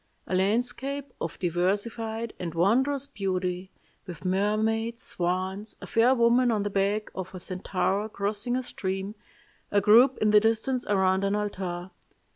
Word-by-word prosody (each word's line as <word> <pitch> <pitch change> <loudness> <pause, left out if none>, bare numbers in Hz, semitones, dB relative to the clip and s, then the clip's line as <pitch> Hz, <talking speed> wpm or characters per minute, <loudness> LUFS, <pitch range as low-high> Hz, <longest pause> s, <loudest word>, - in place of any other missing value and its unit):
A - - -5
landscape 245 +8 0
of 165 - -4
diversified 215 +6 -1
and 170 -2 -5
wondrous 260 +10 +2
beauty, 185 -6 -3 0.4
with 180 0 -9
mermaids, 220 +5 0
swans, 185 +4 -2
a - - -8
fair 240 +3 +3
woman 240 +1 +4
on 215 -3 +1
the 205 - -3
back 200 +2 0
of 185 0 -6
a - - -6
centaur 190 +3 -1
crossing 210 +4 -2
a 255 - -1
stream, 195 -3 -4 0.6
a 205 - +3
group 235 +6 +6
in 215 0 +2
the 210 - +8
distance 225 +4 0
around 190 -1 +2
an 200 +1 +1
altar. 190 -3 -4
205 Hz, 145 wpm, -27 LUFS, 190-230 Hz, 0.6 s, the